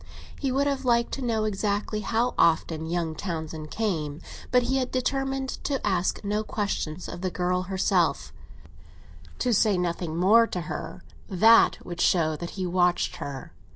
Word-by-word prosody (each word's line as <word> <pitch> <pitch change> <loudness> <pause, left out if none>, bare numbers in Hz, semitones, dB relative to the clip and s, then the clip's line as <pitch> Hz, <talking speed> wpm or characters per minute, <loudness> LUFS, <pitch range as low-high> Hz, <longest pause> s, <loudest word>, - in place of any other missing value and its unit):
He 270 -2 -1
would 275 +2 +1
have 275 -1 -1
liked 235 -2 +2
to 275 - -4
know 230 -3 0
exactly 210 0 -1
how 230 +3 0
often 160 -1 +2
young 165 -1 -1
Townsend 160 -3 -5
came; 160 -9 -2 0.3
but 250 -1 +4
he 260 +3 0
had 255 -1 -1
determined 270 +1 -1 0.2
to 275 -2 0
ask 185 -1 0
no 210 +1 -1
questions 190 -6 -3
of 175 - -7
the 185 - -1
girl 180 0 0
herself—to 190 +5 -3
say 210 -2 +3
nothing 170 -2 -2
more 220 +6 +5
to 180 - -4
her - - -6 0.3
that 220 +4 +5
would 175 -1 -5
show 160 -3 +3
that 170 +2 -6
he 185 - -1
watched 180 0 +1
her. 135 -9 -7
195 Hz, 155 wpm, -26 LUFS, 175-235 Hz, 0.3 s, more